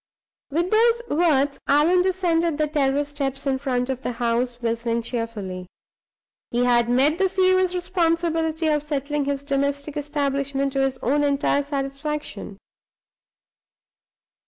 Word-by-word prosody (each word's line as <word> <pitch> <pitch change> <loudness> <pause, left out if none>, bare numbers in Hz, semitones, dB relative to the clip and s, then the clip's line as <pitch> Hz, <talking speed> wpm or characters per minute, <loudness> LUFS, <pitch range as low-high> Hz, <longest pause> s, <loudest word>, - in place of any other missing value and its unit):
With 340 +5 -1
those 465 +2 +3
words 290 -3 +2
Allan 310 +6 +4
descended 340 -4 +1
the 305 - +2
terrace 290 -1 0
steps 275 -1 -3
in 265 -1 0
front 250 -3 -1
of 260 -1 -3
the 250 - -3
house, 240 +1 -1
whistling 230 0 -1
cheerfully. 210 -7 -5 0.8
He 240 +1 0
had 240 -1 +3
met 275 +6 +3
the 385 -1 +3
serious 370 -1 +2
responsibility 330 -2 0
of 300 -1 +2
settling 290 -1 -2
his 280 0 -2
domestic 280 +1 -1
establishment 280 -2 -1
to 275 - 0
his 270 -1 0
own 285 +5 +2
entire 285 0 +2
satisfaction. 280 +1 -4
285 Hz, 130 wpm, -23 LUFS, 265-320 Hz, 0.8 s, Allan